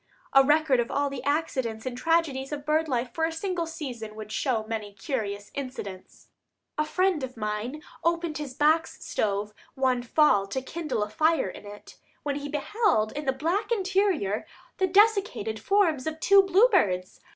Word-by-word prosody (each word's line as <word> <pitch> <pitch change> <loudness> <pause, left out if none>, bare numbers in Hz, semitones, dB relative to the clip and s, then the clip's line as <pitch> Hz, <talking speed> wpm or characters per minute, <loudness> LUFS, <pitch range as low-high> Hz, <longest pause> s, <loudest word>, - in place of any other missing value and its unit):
A 270 -1 +8
record 295 -2 +3
of 235 - 0
all 285 0 0
the 270 -2 -5
accidents 260 -7 -1
and 255 -1 -3
tragedies 290 -2 0
of 290 -1 -5
bird 310 +1 +2
life 250 -3 -1
for 320 - -2
a 325 - +2
single 340 0 -2
season 245 -9 -6
would 215 -1 -8
show 230 -1 0
many 215 -2 -4
curious 205 -2 -4
incidents. 255 -9 -7 0.5
A 305 - 0
friend 365 -2 +1
of 255 -2 -6
mine 215 +8 -4 0.2
opened 335 -2 0
his 275 -4 -6
box 310 +3 +1
stove 205 0 -1 0.2
one 260 -2 +1
fall 240 -6 +3
to 230 +7 -3
kindle 275 -7 -2
a 210 - -5
fire 315 +5 +2
in 205 - -10
it, 205 0 -12 0.2
when 285 -1 -1
he 290 0 -5
beheld 295 - +1
in 295 +1 -5
the 265 - +3
black 340 - -1
interior 380 - +1 0.3
the 380 - +3
desiccated 390 - +2
forms 325 - +2
of 315 0 -3
two 395 +4 +6
bluebirds. 375 - +3
285 Hz, 170 wpm, -27 LUFS, 225-330 Hz, 0.5 s, A